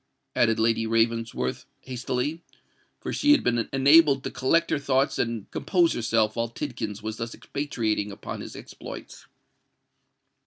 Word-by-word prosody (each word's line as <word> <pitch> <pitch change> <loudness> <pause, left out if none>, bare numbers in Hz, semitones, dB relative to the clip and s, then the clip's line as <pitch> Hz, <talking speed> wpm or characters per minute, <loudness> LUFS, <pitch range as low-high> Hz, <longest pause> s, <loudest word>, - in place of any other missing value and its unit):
added 115 -2 +3
Lady 115 0 +2
Ravensworth, 115 - 0
hastily—for 130 +5 -6
she 290 0 +5
had 295 - +3
been 120 -2 +1
enabled 140 0 +5
to - - -4
collect 165 +6 +1
her - - +2
thoughts 135 0 +1
and 115 -3 -1
compose 175 -3 +2
herself 110 -2 +1
while 115 0 -1
Tidkins 115 -5 -5
was 110 0 -4
thus 115 0 -5
expatiating 110 -8 -2
upon 100 - -7
his - - -8
exploits. - - -10
120 Hz, 130 wpm, -26 LUFS, 115-140 Hz, -, she